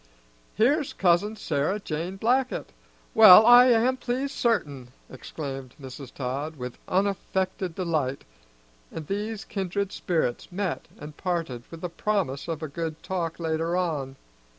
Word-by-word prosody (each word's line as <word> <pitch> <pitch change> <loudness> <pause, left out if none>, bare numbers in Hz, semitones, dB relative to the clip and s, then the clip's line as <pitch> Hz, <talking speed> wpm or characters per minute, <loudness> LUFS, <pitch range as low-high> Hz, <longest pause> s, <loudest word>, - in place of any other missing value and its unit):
"Here's 280 +7 +2
Cousin 190 +4 +2
Sarah 160 +1 -1
Jane 170 0 -4
Blackett! 250 +5 0 0.4
Well, 215 -1 +10
I 245 +1 +9
am 245 +2 +3
pleased, 260 +3 -2
certain!" 145 - -1 0.2
exclaimed 135 -1 -7
Mrs. 130 -1 -9
Todd, 140 +4 -4
with 125 -3 -7
unaffected 190 -2 -1
delight; 155 -7 -1 0.7
and 160 - -6
these 210 +4 -4
kindred 200 -1 -3
spirits 165 -5 -2
met 185 -1 -3
and 150 0 -10
parted 165 -10 -3
with 165 -1 -10
the 180 - -3
promise 170 -7 -2
of 160 -2 -4
a - - -2
good 160 +1 -5
talk 170 -3 -3
later 165 +1 -1
on. 150 -7 -2
175 Hz, 130 wpm, -26 LUFS, 150-205 Hz, 0.7 s, Well